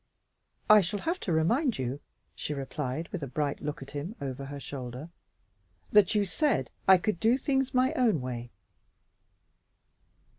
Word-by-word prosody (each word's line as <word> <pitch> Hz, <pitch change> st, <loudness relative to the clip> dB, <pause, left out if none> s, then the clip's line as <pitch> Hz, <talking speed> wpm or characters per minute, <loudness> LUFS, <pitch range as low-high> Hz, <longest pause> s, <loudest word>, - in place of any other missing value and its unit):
"I 215 Hz, 0 st, +8 dB
shall 195 Hz, +3 st, -3 dB
have 340 Hz, +3 st, -1 dB
to 185 Hz, -, -3 dB
remind 230 Hz, -, +2 dB
you," 130 Hz, +2 st, -3 dB, 0.3 s
she 150 Hz, -, -4 dB
replied 140 Hz, +2 st, -4 dB
with 185 Hz, -, -5 dB
a 140 Hz, -, -3 dB
bright 140 Hz, +2 st, -2 dB
look 150 Hz, -2 st, -4 dB
at 135 Hz, -, -12 dB
him 150 Hz, +9 st, -5 dB
over 135 Hz, 0 st, -5 dB
her 140 Hz, +1 st, -7 dB
shoulder, 130 Hz, +2 st, -7 dB, 0.8 s
"that 210 Hz, 0 st, +5 dB
you 205 Hz, -1 st, +3 dB
said 220 Hz, -, 0 dB, 0.2 s
I 190 Hz, 0 st, +9 dB
could 180 Hz, -1 st, -1 dB
do 230 Hz, +3 st, +4 dB
things 270 Hz, -1 st, 0 dB
my 260 Hz, +3 st, +2 dB
own 235 Hz, -, +2 dB
way." 120 Hz, -2 st, -5 dB
165 Hz, 155 wpm, -29 LUFS, 140-220 Hz, 0.8 s, I